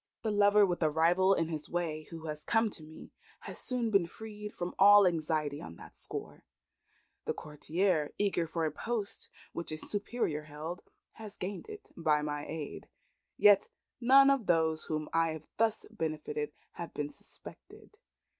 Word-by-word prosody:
The 220 - 0
lover 205 0 +5
with 180 -2 -2
a 155 - +4
rival 175 +5 +4
in 165 -1 0
his 155 -2 -5
way, 160 -3 -2
who 165 -1 -8
has 150 -1 -4
come 225 -1 +2
to 170 - -5
me, 155 +1 -12 0.3
has - - -7
soon 245 -3 0
been 195 -5 +4
freed 210 +2 -8
from 175 -2 -5
all 205 0 +9
anxiety 155 -4 0
on 80 0 -9
that - - -13
score. - - -7 0.8
The - - -1
courtier, 155 +1 0
eager 195 -5 +1
for 165 0 -1
a 155 - 0
post 215 +5 -3 0.2
which 170 - -4
a 155 - -3
superior 200 -5 -2
held, 155 +4 -6 0.3
has 215 -2 -10
gained 195 - -5
it 425 0 -10
by 150 -3 +2
my 145 -1 -3
aid. 155 -2 -6 0.5
Yet 205 -1 +6 0.3
none 270 +3 +7
of 270 -7 0
those 160 -2 +2
whom 155 -1 -2
I 165 -1 +2
have 160 - -9
thus 225 -1 +1
benefited 155 -6 -3 0.2
have 170 - -8
been 145 0 -3
suspected. 425 - -14
170 Hz, 165 wpm, -32 LUFS, 155-205 Hz, 0.8 s, all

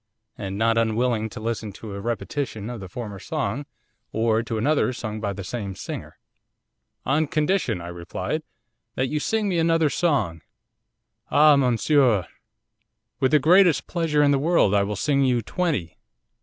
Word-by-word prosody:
And 95 -1 -5
not 115 +1 +2
unwilling 115 0 0
to 115 - -8
listen 110 -1 -3
to 105 +1 -9
a 100 - -6
repetition 120 0 -3
of 120 - -6
the 95 -2 -8
former 105 -1 -6
song, 115 +10 -3 0.4
or 110 0 +1
to 115 -1 -4
another 140 +3 +2
sung 110 -3 -5
by 100 -2 -1
the 100 0 -6
same 100 0 -5
singer. - - -7 0.9
'"On 150 +4 +2
condition," 155 - 0
I 85 - -7
replied, 85 -1 -4 0.5
"that 130 0 0
you 150 - -1
sing 220 +6 0
me 180 -3 +1
another 165 -2 +3
song." 135 - 0 0.9
'"Ah, 150 0 +6
monsieur, 125 - +3 0.9
with 130 - +3
the 150 - +5
greatest 175 +3 +5
pleasure 160 -4 +1
in 145 - +4
the 140 - +3
world 155 - +3
I 100 - +4
will 100 +1 -2
sing 140 +6 +1
you 125 -3 +2
twenty." 150 - -2
120 Hz, 160 wpm, -24 LUFS, 105-150 Hz, 0.9 s, Ah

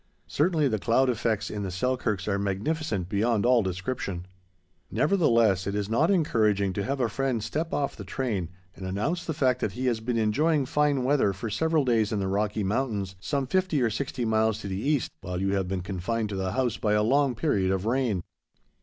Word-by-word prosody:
Certainly 155 -1 +1
the 110 -3 -1
cloud 125 +5 +3
effects 110 -2 -1
in 105 - -4
the 95 - -3
Selkirks 110 -1 -1
are 100 -1 0
magnificent 100 - -2
beyond 110 +2 +1
all 125 -1 +5
description. 95 -1 -3 0.6
Nevertheless, 115 - +3
it 100 - -2
is 105 0 -2
not 150 +9 +3
encouraging 110 - +2
to 100 - -2
have 135 +7 -2
a 120 - +2
friend 120 0 -1
step 160 +7 -2
off 140 -1 -1
the 100 - -8
train 100 -4 -2 0.3
and 95 - -7
announce 125 - -1
the 160 - -3
fact 130 -4 +2
that 95 - -1
he 125 +4 -3
has 120 -3 +1
been 115 +1 -2
enjoying 140 +7 +2
fine 145 -1 +1
weather 130 -6 +2
for 105 +3 -5
several 155 +6 +1
days 115 -3 +2
in 110 - 0
the 95 - -1
Rocky 105 +2 0
Mountains, 100 -2 -1
some 140 +7 -1
fifty 185 +1 +1
or 120 -3 +2
sixty 125 +1 -3
miles 110 -1 +2
to - - -6
the 95 0 -3
east, 145 -1 0
while 90 -1 -4
you 95 +1 0
have 95 -2 0
been 95 0 -2
confined 100 +4 -2
to 100 - -4
the 95 -1 -2
house 125 -4 0
by 105 -1 0
a 105 0 +3
long 135 +2 +2
period 105 -8 +1
of 95 +1 0
rain. 115 -6 0
110 Hz, 205 wpm, -27 LUFS, 100-135 Hz, 0.6 s, all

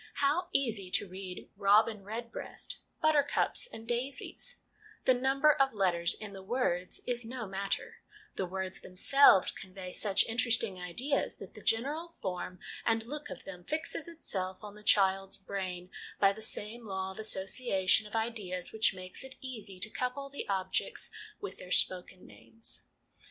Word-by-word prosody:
How 300 +6 +2
easy 225 - 0
to 200 - 0
read 185 0 -7
' - - -44
robin 210 +1 +4
redbreast/ 230 +3 -5 0.2
'buttercups 300 +8 +4
and 225 0 -9
daisies'; 260 - -2 0.5
the 260 - +7
number 270 +4 +4
of 270 -4 +2
letters 175 -4 +3
in 210 -2 -8
the 195 - -8
words 190 -4 0
is 245 -1 0
no 230 0 -5
matter; 195 0 -3 0.4
the 190 - -1
words 190 +1 -4
them 185 - -13
selves 275 -3 +7
convey 185 -1 -8
such 200 -3 +3
interesting 230 -4 +1
ideas 245 +11 0
that - - -10
the - - -11
general 295 +9 0
form 180 -1 -4 0.2
and 225 -1 +2
look 295 +4 -6
of - - -7
them 180 -2 -9
fixes 315 - -1
itself 190 - -3
on 205 -1 -7
the 210 - -11
child's 195 -2 +3
brain 185 -2 -4 0.3
by 195 -1 +6
the 220 - -10
same 220 +2 -1
law 190 -1 -2
of 190 - -11
association 195 -1 +2
of 210 - -8
ideas 210 -6 -2
which 220 -2 +3
makes 185 +4 -6
it 265 0 -10
easy 220 -8 -7
to 185 - 0
couple 275 +2 -3
the 280 - -5
objects 190 -1 0 0.3
with 400 -1 -6
their 180 - -9
spoken 185 0 +2
names. 115 +2 -7
210 Hz, 160 wpm, -32 LUFS, 185-250 Hz, 0.5 s, the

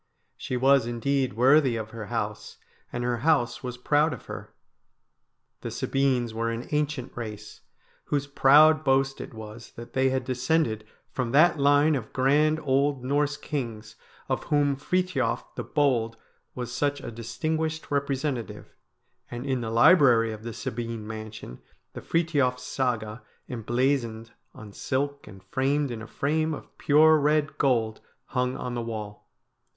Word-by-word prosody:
She 125 - -4
was 135 -1 +4
indeed 130 +1 0
worthy 130 +2 +4
of 110 -1 -5
her 115 -3 -7
house, - - -4 0.3
and 120 - -3
her 120 0 0
house 125 -3 +1
was 125 -1 -5
proud 145 +4 +2
of - - -10
her - - -8 1.1
The - - -5
Sabines 130 -4 0
were 115 +1 -1
an 115 +1 -4
ancient 150 -3 -2
race, 105 -3 -8 0.4
whose 145 -1 -1
proud 150 +3 +5
boast 135 -1 +1
it - - -8
was 110 +1 -10
that 120 0 -11
they 130 0 +2
had 130 -1 -1
descended 125 -3 0 0.2
from 125 -3 -2
that 155 +2 +5
line 145 +2 +4
of 125 -6 -4
grand 150 +4 +3
old 140 -1 +1
Norse 145 +2 0
kings 115 -8 -5 0.3
of - - -2
whom 145 -1 +2
Frithiof 145 -6 -1
the - - -5
Bold 120 -6 +1 0.4
was 125 -1 -5
such 145 +2 0
a - - -6
distinguished 155 +9 -3
representative, 140 -3 -2 0.6
and 120 +2 -6
in 130 -3 -1
the 115 - -3
library 120 -3 +5
of 110 -1 -7
the 115 +1 -6
Sabine 115 0 -5
mansion 110 - -8 0.3
the - - -7
Frithiof 145 -7 +1
Saga 120 -4 -2 0.3
emblazoned 120 -1 -1 0.2
on 105 -2 -11
silk 140 +2 -3
and 95 -3 -13
framed 135 +7 0
in 115 -2 -5
a 110 - -8
frame 155 +6 -1
of - - -13
pure 155 +2 +5
red 150 +1 +1
gold 115 -5 +1 0.3
hung 125 -1 -1
on 125 - -4
the 120 - -2
wall. 105 -3 -7
130 Hz, 150 wpm, -26 LUFS, 115-145 Hz, 1.1 s, proud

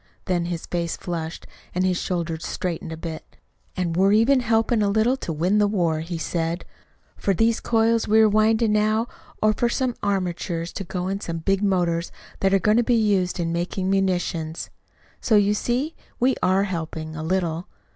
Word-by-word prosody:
Then 175 -2 0
his 170 -1 -4
face 170 -1 -2
flushed, 165 -2 -5 0.3
and 185 +1 +2
his 185 -1 +1
shoulders 170 -2 -2
straightened 170 -2 -3
a 160 - -5
bit. 160 -1 -8 0.4
'And 175 -3 -1
we're 195 +3 +4
even 240 +5 +5
helping 225 -1 +2
a 205 - +2
little 220 +5 +3
to 175 - -5
win 180 +7 +1
the 205 - +4
war,' 170 -6 +1
he 165 +2 -4
said, 165 +1 -2 0.5
'for 195 - 0
these 225 +3 +2
coils 230 0 +2
we 215 +1 +5
are 220 - +6
winding 215 +1 +3
now 215 +2 +2 0.4
are 215 0 +5
for 235 +3 +1
some 255 0 0
armatures 175 -3 -2
to 195 - -4
go 180 0 -4
in 195 +1 -2
some 170 -4 -4
big 195 +4 0
motors 175 -4 +1 0.3
that 195 - +2
are 195 - +5
going 210 +3 +3
to 240 - +4
be 240 +1 +2
used 200 -5 +1
in 165 -1 -1
making 185 +2 -1
munitions. 175 -4 -1 0.5
So 220 - +2
you 205 0 +4
see, 250 +9 -1 0.3
we 255 +2 +3
are 190 +2 +3
helping 160 -4 -4
a 155 - -5
little.' 170 0 -1
190 Hz, 185 wpm, -24 LUFS, 170-215 Hz, 0.5 s, are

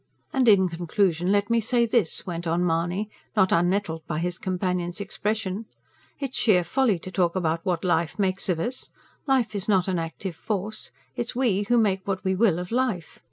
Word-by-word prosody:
"And 260 -2 +2
in 195 -4 +6
conclusion 175 +1 0
let 205 +2 +2
me 230 - +4
say 235 +2 +2
this," 225 -7 0
went 170 -1 -4
on 170 +2 +1
Mahony, 175 +5 0 0.3
not 190 -3 +4
unnettled 175 -1 +1
by 155 - -2
his 175 +2 -2
companion's 180 -1 -2
expression. 205 0 -2 0.5
"It's 275 -3 -4
sheer 185 -6 +4
folly 230 +2 +2
to 185 +3 -9
talk 175 -2 +1
about 165 -2 0
what 175 -3 0
life 170 0 +1
makes 195 -1 0
of 175 -3 +1
us. 245 +9 -3 0.4
Life 255 -5 +2
is 200 0 -3
not 190 -3 +3
an 185 -2 0
active 165 +2 -5
force. 210 +3 -4 0.3
It's 240 -2 -4
we 215 -6 +1
who 240 - +4
make 195 -4 +1
what 195 -1 -2
we 190 - +1
will, 190 -3 +3
of 180 +2 -5
life. 235 -10 -1
190 Hz, 190 wpm, -25 LUFS, 175-215 Hz, 0.5 s, in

